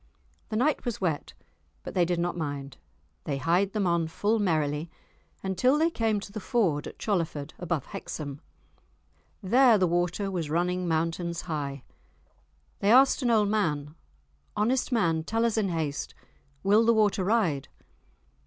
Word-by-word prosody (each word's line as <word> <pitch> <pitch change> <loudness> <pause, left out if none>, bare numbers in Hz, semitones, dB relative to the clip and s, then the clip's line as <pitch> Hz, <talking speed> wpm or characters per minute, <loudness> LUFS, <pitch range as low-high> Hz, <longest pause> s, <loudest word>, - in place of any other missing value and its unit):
The - - -3
night 275 +7 +1
was 240 -4 -3
wet, 165 -6 -2 0.5
but - - -7
they 180 -2 +3
did 175 0 -1
not 175 +1 -1
mind. 145 -4 -5 0.5
They 140 -2 -2
hied 175 +7 +1
them 210 -2 0
on 170 -2 +1
full 210 +7 0
merrily 155 -4 0 0.5
until 195 +9 +2
they 325 +2 +2
came 225 -6 0
to 200 - -9
the 215 - -5
ford 185 -9 0
at - - -10
Cholerford, 165 -7 -2
above 170 -5 -2
Hexham. 145 -1 -7 1.0
There 240 +3 +5
the 185 - +3
water 175 +3 0
was 170 -5 -3
running 180 +3 0
mountains 165 +1 -1
high. 145 -5 -4 1.0
They 200 - +2
asked 265 +4 +6
an 245 - +1
old 215 -3 +3
man, 150 -9 -1 0.6
"Honest 245 +6 +1
man, 165 -9 +1
tell 225 +6 0
us 230 - +1
in 215 -4 +1
haste, 155 -4 -3 0.5
will 205 +3 +5
the 230 0 +4
water 210 -2 +2
ride?" 180 - +1
180 Hz, 155 wpm, -27 LUFS, 160-215 Hz, 1.0 s, asked